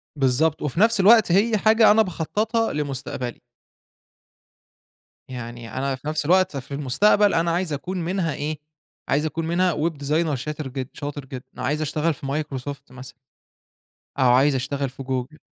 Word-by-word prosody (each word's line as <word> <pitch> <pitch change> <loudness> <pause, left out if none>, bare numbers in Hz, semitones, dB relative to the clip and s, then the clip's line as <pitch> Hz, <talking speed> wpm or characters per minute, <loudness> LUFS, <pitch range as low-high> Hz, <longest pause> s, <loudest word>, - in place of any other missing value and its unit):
بالضبط، 140 +3 +1
وفي 150 +3 -2
نفس 225 +1 +4
الوقت 215 0 +6
هي 215 +5 +3
حاجة 220 +2 +5
أنا 220 +1 +5
باخططها 215 +5 -1
لمستقبلي. 135 -4 -4 1.9
يعني 120 -2 -8
أنا 135 0 -1
في 130 +3 -11
نفس 155 -1 -1
الوقت 185 -1 +3
في 135 +1 -8
المستقبل، 200 +10 +3
أنا 165 +1 +1
عايز 175 -2 -1
أكون 175 +7 -4
منها 170 -2 -1
إيه، 150 +1 -4 0.5
عايز 150 +3 +1
أكون 160 +1 -3
منها 175 +1 +2
web 155 +3 0
designer 150 +2 -1
شاتر 150 +3 -5
جد 130 0 -5
شاطر 145 -1 -6
جدًا 130 -1 -8 0.2
عايز 145 +4 -1
أشتغل 155 +2 0
في 140 0 -11
Microsoft 140 -2 -5
مثلًا 130 0 -11 1.1
أو 130 -2 +4
عايز 135 +3 +4
أشتغل 135 +1 -2
في 135 +2 -10
Google. 130 +2 -4
150 Hz, 155 wpm, -23 LUFS, 135-175 Hz, 1.9 s, الوقت